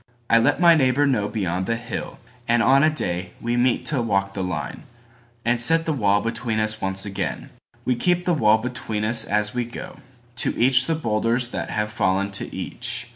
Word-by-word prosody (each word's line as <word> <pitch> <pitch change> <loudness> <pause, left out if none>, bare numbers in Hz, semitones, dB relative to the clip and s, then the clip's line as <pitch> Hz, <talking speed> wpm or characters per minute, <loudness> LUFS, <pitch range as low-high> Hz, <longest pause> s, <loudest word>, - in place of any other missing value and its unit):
I 115 - +6
let 115 - +2
my 170 -1 +6
neighbor 140 -2 +2
know 125 -7 +1
beyond 95 -4 -3
the 115 - 0
hill; 115 0 -6 0.3
And 120 0 +2
on 135 +3 +4
a 155 - +5
day 90 - -3
we 120 +1 -2
meet 120 0 +1
to 140 -5 0
walk 100 -3 -1
the 95 - -4
lineAnd 85 -6 -4 0.8
set 165 +7 +5
the 160 - 0
wall 105 -6 +2
between 115 -1 -2
us 110 0 -1
once 95 0 -2
again. 95 -4 -5 0.3
We 125 - +2
keep 175 +7 0
the 180 - +2
wall 110 -7 +4
between 110 -2 -4
us 115 0 +4
as 105 +1 0
we 125 0 -1
go. 120 +1 -9 0.4
To - - -1
each 130 +1 +4
the 165 - +1
boulders 115 -2 0
that - - -5
have 105 0 -3
fallen 100 0 0
to 95 - -2
each. - - -3
115 Hz, 195 wpm, -22 LUFS, 100-130 Hz, 0.8 s, I